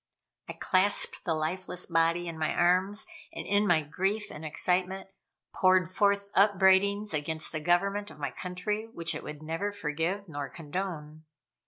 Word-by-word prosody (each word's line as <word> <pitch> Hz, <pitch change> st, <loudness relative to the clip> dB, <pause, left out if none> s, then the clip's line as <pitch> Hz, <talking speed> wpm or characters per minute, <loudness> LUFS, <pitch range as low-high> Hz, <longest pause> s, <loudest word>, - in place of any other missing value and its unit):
I -, -, -3 dB
clasped 195 Hz, +2 st, +2 dB
the 165 Hz, -3 st, +1 dB
lifeless 180 Hz, +3 st, -3 dB
body 165 Hz, +1 st, +1 dB
in 165 Hz, -1 st, -6 dB
my 155 Hz, -, 0 dB
arms, 185 Hz, +4 st, +2 dB, 0.3 s
and -, -, -7 dB
in 205 Hz, +1 st, +2 dB
my 160 Hz, -4 st, +3 dB
grief 195 Hz, +7 st, -2 dB
and 150 Hz, -, -8 dB
excitement, 185 Hz, +4 st, -1 dB, 0.4 s
poured 185 Hz, -2 st, +3 dB
forth 200 Hz, +1 st, +2 dB
upbraidings 200 Hz, +1 st, +4 dB
against 155 Hz, +1 st, -2 dB
the 155 Hz, -, -3 dB
government 195 Hz, +5 st, +1 dB
of -, -, -13 dB
my 145 Hz, -2 st, -3 dB
country 200 Hz, +5 st, -3 dB
which 170 Hz, -5 st, -3 dB
it -, -, -5 dB
would 150 Hz, 0 st, -8 dB
never 165 Hz, +6 st, -2 dB
forgive 185 Hz, +2 st, -2 dB
nor 145 Hz, -4 st, -5 dB
condone. 155 Hz, -1 st, -6 dB
180 Hz, 155 wpm, -29 LUFS, 160-200 Hz, 0.4 s, upbraidings